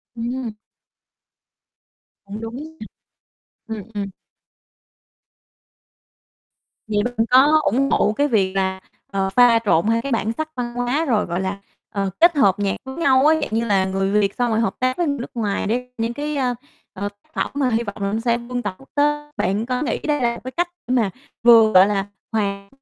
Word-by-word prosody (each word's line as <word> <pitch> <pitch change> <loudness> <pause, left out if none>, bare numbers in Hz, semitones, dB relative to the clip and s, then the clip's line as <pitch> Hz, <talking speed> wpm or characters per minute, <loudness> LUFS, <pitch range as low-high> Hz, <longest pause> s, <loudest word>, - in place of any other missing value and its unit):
Ừm. 240 0 -4 1.7
Cũng 205 +2 -7
đúng, 275 +8 -7 0.9
ơ. 225 - -4
Ừm, 210 - -7
ừm. 200 -1 -3 2.8
Vậy 210 -1 0
bạn 245 -1 0
có 285 +5 +6
ủng 275 +3 +1
hộ 210 - +3
cái 285 +6 +1
việc 200 -7 +1
là, 190 -1 0 0.3
ờ, 195 -1 0
pha 235 +2 +5
trộn 170 -1 +3
hai 230 +1 +2
cái 275 - -5
bản 225 -2 0
sắc 315 +6 -4
văn 240 -1 -4
hóa 245 +6 0
rồi, 225 -7 +1
gọi 175 +2 -2
là, 190 +1 -2 0.3
ờ, 195 -1 -2
kết 340 0 +6
hợp 205 -9 +3
nhạc 200 -1 0
với 265 0 -8
nhau 270 -5 +3
á, 315 - +5
dạng - - -2
như 230 +1 0
là 195 -3 +2
người 195 +1 -1
Việt 200 -1 0
xong 245 -2 0
rồi 220 - +1
hợp 225 -3 0
tác 255 0 0
với 345 - +1
người 280 -1 -1
nước 240 - -6
ngoài 210 -5 -1
để 250 +3 -2
những 230 +1 -1
cái, 295 +3 -3
a, 250 -2 0 0.4
ờ, 200 +2 -4
tác 205 0 -33
phẩm - - -2
mà 280 -2 +1
hy 230 0 0
vọng 205 -3 -6
mà 200 0 -1
nó 220 - 0
sẽ 235 0 +1
vươn 245 +1 -5
tầm 205 -4 -3
quốc 270 - -19
tế. 295 0 +1
Bạn 200 +5 0
có 250 0 -2
nghĩ 305 - -1
đây 295 -2 -1
là 235 -1 +2
một - - -10
cái 255 - -6
cách 350 +5 0 0.2
để 250 - 0
mà 225 -5 +2 0.3
vừa, 230 -2 +7
gọi 185 +1 +7
là, 200 -1 -1 0.2
hòa 200 -2 -2
230 Hz, 200 wpm, -21 LUFS, 205-260 Hz, 2.8 s, vừa